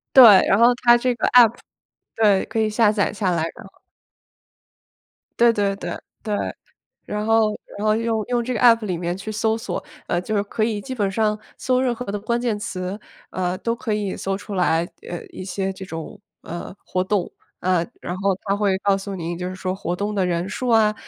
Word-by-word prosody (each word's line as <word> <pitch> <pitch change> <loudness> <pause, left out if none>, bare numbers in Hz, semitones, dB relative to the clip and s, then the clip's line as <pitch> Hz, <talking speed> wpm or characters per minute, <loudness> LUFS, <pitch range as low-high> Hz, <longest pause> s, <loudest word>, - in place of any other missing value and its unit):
对， 260 - +11 0.2
然 195 - +4
后 235 +2 +6
它 240 -1 +7
这 250 +1 +1
个 - - 0
App， 240 -3 +7 0.6
对， 205 -3 +3
可 225 - -3
以 215 - +1
下 215 0 +3
载 205 -2 +1
下 195 -3 -1
来， 170 -2 0
然 235 - -11
后 195 - -24 1.6
对 235 0 +6
对 200 -3 0
对， 200 - -5 0.3
对。 215 -2 -2 0.7
然 210 0 -3
后 220 -1 +3 0.2
然 210 - -3
后， 215 - +4
用 225 -1 0
用 245 -1 0
这 250 +2 -2
个 220 - -2
App 230 -3 +5
里 180 -4 -2
面 175 0 -2
去 205 +3 -6
搜 220 +1 0
索， 225 - -4 0.3
呃， 175 - +1
就 215 +3 -3
是 200 - +2
可 210 +2 -5
以 215 -2 -1
基 260 +4 -6
本 205 -6 0
上 210 +1 0 0.2
搜 255 -1 +1
任 255 -2 +1
何 250 - -6
的 205 +1 -3
关 235 +3 -1
键 230 -4 -1
词， 185 0 -4 0.3
呃， 185 0 -2
都 230 +2 -1
可 230 -2 -3
以 205 -2 -2
搜 195 0 -2
出 205 0 -7
来， 170 -2 +2 0.3
呃， 175 - -6
一 185 - -9
些 195 +1 -2
这 190 0 -8
种， 165 -3 -7 0.2
呃， 175 +2 -7
活 185 - -1
动。 190 -1 -1 0.3
呃， 180 -2 +2 0.2
然 175 - -4
后 195 -1 +1
它 200 -1 0
会 200 -2 +1
告 200 0 +2
诉 195 0 -6
你 170 -1 -4
就 180 +1 -4
是 185 - -7
说 185 0 -3
活 180 -2 -3
动 205 +3 -2
的 195 -3 +1
人 175 +1 -1
数 250 +4 -4
啊， 220 -2 +4
205 Hz, 240 characters per minute, -22 LUFS, 185-225 Hz, 1.6 s, 对